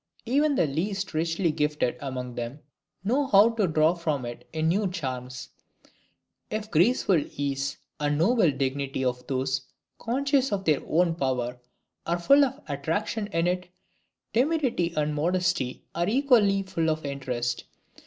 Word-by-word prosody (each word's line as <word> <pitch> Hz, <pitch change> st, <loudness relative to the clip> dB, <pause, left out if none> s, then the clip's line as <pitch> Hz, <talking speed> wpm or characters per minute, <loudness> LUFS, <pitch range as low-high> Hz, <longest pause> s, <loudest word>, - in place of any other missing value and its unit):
Even 285 Hz, +4 st, +2 dB
the 170 Hz, -, +3 dB
least 190 Hz, +7 st, -2 dB
richly 165 Hz, +2 st, +1 dB
gifted 150 Hz, -4 st, 0 dB
among 130 Hz, -3 st, -5 dB
them 120 Hz, +5 st, -5 dB, 0.4 s
know 265 Hz, +7 st, +1 dB
how 210 Hz, 0 st, +6 dB
to 220 Hz, -4 st, +1 dB
draw 155 Hz, 0 st, +3 dB
from 155 Hz, -7 st, -2 dB
it 120 Hz, 0 st, -8 dB
new 165 Hz, +6 st, +1 dB
charms. 130 Hz, -7 st, -5 dB, 1.0 s
If 215 Hz, 0 st, -2 dB
the 215 Hz, -, -17 dB
graceful 180 Hz, -, +3 dB
ease 140 Hz, -1 st, -2 dB, 0.2 s
and 145 Hz, 0 st, 0 dB
noble 190 Hz, +2 st, +4 dB
dignity 135 Hz, -1 st, -2 dB
of 125 Hz, 0 st, -2 dB
those 135 Hz, 0 st, -1 dB, 0.4 s
conscious 270 Hz, +2 st, +1 dB
of 195 Hz, -1 st, -2 dB
their 150 Hz, -3 st, +3 dB
own 170 Hz, +1 st, +2 dB
power 125 Hz, -5 st, -2 dB, 0.5 s
are 170 Hz, +1 st, +1 dB
full 275 Hz, +12 st, +5 dB
of 270 Hz, -, -2 dB
attraction 165 Hz, +9 st, -2 dB
in 165 Hz, -4 st, 0 dB
it, 180 Hz, 0 st, -1 dB, 0.7 s
timidity 255 Hz, -, +1 dB
and 150 Hz, 0 st, +1 dB
modesty 175 Hz, -3 st, 0 dB
are 175 Hz, +3 st, 0 dB
equally 225 Hz, -6 st, +4 dB
full 170 Hz, -4 st, -1 dB
of 155 Hz, -1 st, -2 dB
interest. 125 Hz, -3 st, -3 dB
165 Hz, 145 wpm, -27 LUFS, 140-205 Hz, 1.0 s, how